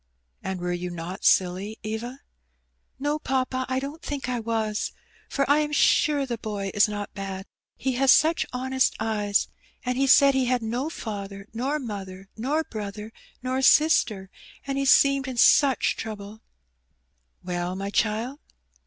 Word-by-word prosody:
"And 190 Hz, -1 st, -4 dB
were 175 Hz, 0 st, -2 dB
you 175 Hz, 0 st, -4 dB
not 175 Hz, +2 st, -7 dB
silly, 190 Hz, +4 st, +2 dB
Eva?'* 235 Hz, +5 st, -5 dB, 0.8 s
"No, 290 Hz, +3 st, -1 dB
papa, 260 Hz, -2 st, -1 dB
I 260 Hz, 0 st, 0 dB
don't 285 Hz, +4 st, -7 dB
think 285 Hz, -5 st, -4 dB
I 250 Hz, -1 st, -1 dB
was; 220 Hz, -2 st, -2 dB, 0.4 s
for 275 Hz, -, 0 dB
I 290 Hz, +2 st, +4 dB
am 300 Hz, -1 st, -1 dB
sure 295 Hz, -1 st, +3 dB
the 240 Hz, -3 st, -4 dB
boy 200 Hz, -3 st, -4 dB
is 205 Hz, -, +4 dB
not 205 Hz, -1 st, -5 dB
bad, 195 Hz, -1 st, -6 dB, 0.3 s
he 265 Hz, -, -1 dB
has 260 Hz, +1 st, +4 dB
such 320 Hz, +2 st, +4 dB
honest 260 Hz, +1 st, 0 dB
eyes. 210 Hz, -2 st, 0 dB, 0.4 s
And 250 Hz, +1 st, -1 dB
he 275 Hz, -, +3 dB
said 280 Hz, 0 st, +7 dB
he 265 Hz, -1 st, +1 dB
had 250 Hz, -1 st, 0 dB
no 245 Hz, +7 st, -2 dB
father, 200 Hz, -8 st, -6 dB
nor 265 Hz, +6 st, -1 dB
mother, 195 Hz, -7 st, -7 dB
nor 285 Hz, +8 st, -1 dB
brother, 210 Hz, -2 st, -7 dB, 0.3 s
nor 260 Hz, +1 st, -1 dB
sister, 235 Hz, -10 st, +4 dB, 0.3 s
and 275 Hz, 0 st, -2 dB
he 275 Hz, -, 0 dB
seemed 275 Hz, 0 st, +4 dB
in 255 Hz, -2 st, -5 dB
such 270 Hz, +2 st, +4 dB
trouble/' 215 Hz, 0 st, -7 dB, 1.0 s
"Well, 180 Hz, 0 st, -3 dB
my 195 Hz, +1 st, -4 dB
child?'' 225 Hz, +7 st, 0 dB
230 Hz, 155 wpm, -25 LUFS, 200-270 Hz, 1.0 s, said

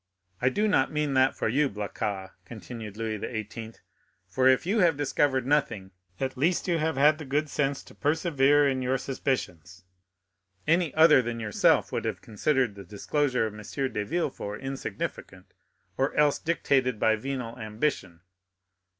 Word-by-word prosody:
"I 125 Hz, -, +4 dB
do 210 Hz, +11 st, 0 dB
not 135 Hz, -10 st, +2 dB
mean 150 Hz, -2 st, -1 dB
that 130 Hz, 0 st, +3 dB
for -, -, -1 dB
you, 140 Hz, +5 st, +2 dB
Blacas," 100 Hz, -2 st, -4 dB
continued 110 Hz, 0 st, -9 dB
Louis 110 Hz, -2 st, -3 dB
XVIII.; 110 Hz, +1 st, -6 dB, 0.5 s
"for 130 Hz, +8 st, +2 dB
if 130 Hz, +3 st, +4 dB
you 205 Hz, +5 st, +1 dB
have 170 Hz, -6 st, +3 dB
discovered 140 Hz, -2 st, +1 dB
nothing, 125 Hz, -9 st, 0 dB, 0.3 s
at 130 Hz, -1 st, -2 dB
least 165 Hz, +9 st, 0 dB
you 170 Hz, -2 st, +1 dB
have 160 Hz, -1 st, -1 dB
had 150 Hz, +3 st, +4 dB
the -, -, -6 dB
good 150 Hz, +2 st, -1 dB
sense 140 Hz, -1 st, -1 dB
to -, -, -16 dB
persevere 145 Hz, -2 st, +2 dB
in 130 Hz, -1 st, 0 dB
your 130 Hz, +1 st, 0 dB
suspicions. 95 Hz, -, -4 dB, 0.8 s
Any 165 Hz, 0 st, +2 dB
other 160 Hz, -3 st, +7 dB
than 120 Hz, -1 st, -4 dB
yourself 110 Hz, -3 st, +2 dB
would -, -, -3 dB
have -, -, -2 dB
considered 125 Hz, +1 st, 0 dB
the 100 Hz, 0 st, -10 dB
disclosure 125 Hz, -, -1 dB
of 110 Hz, -, -5 dB
M. 105 Hz, -, -9 dB
de 125 Hz, -1 st, -3 dB
Villefort 130 Hz, -7 st, -3 dB
insignificant, 135 Hz, -6 st, -6 dB, 0.4 s
or 135 Hz, +1 st, 0 dB
else 150 Hz, -1 st, +3 dB
dictated 135 Hz, -7 st, 0 dB
by 110 Hz, -, +3 dB
venal 125 Hz, 0 st, -5 dB
ambition." 110 Hz, -, -3 dB
130 Hz, 160 wpm, -27 LUFS, 110-145 Hz, 0.8 s, other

